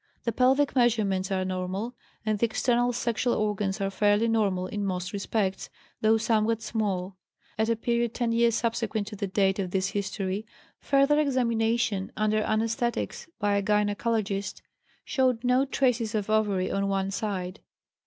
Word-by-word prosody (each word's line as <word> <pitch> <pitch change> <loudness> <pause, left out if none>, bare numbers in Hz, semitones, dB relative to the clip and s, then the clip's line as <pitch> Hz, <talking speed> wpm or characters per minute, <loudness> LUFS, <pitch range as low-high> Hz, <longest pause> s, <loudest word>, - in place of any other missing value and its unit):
The 230 - 0
pelvic 265 +5 +3
measurements 210 -6 +2
are 185 -1 0
normal, 185 +5 -3 0.3
and 215 -1 0
the 235 - +3
external 245 +2 +1
sexual 235 0 0
organs 210 -1 -1
are 195 0 -1
fairly 205 +3 +2
normal 200 -5 +1
in 205 +2 -4
most 180 -2 -3
respects, 200 -1 -2 0.3
though 220 +1 +4
somewhat 225 0 +1
small. 195 -4 -2 0.4
At 220 +1 0
a 230 - +3
period 235 +1 -1
ten 240 -2 0
years 230 0 +3
subsequent 225 -2 -1
to 215 - -8
the 200 0 -3
date 195 0 +1
of 185 -2 -1
this 190 +1 0
history, 200 +1 -3 0.3
further 275 +2 +3
examination, 230 -7 +1
under 215 0 +2
anesthetics, 230 - -1
by 205 0 +1
a - - +1
gynecologist, 205 0 0 0.4
showed 255 -4 +1
no 250 +2 +3
traces 245 -5 0
of 215 0 -1
ovary 205 -4 +1
on 195 0 0
one 195 0 -1
side. 195 -2 -3
215 Hz, 155 wpm, -27 LUFS, 195-235 Hz, 0.4 s, though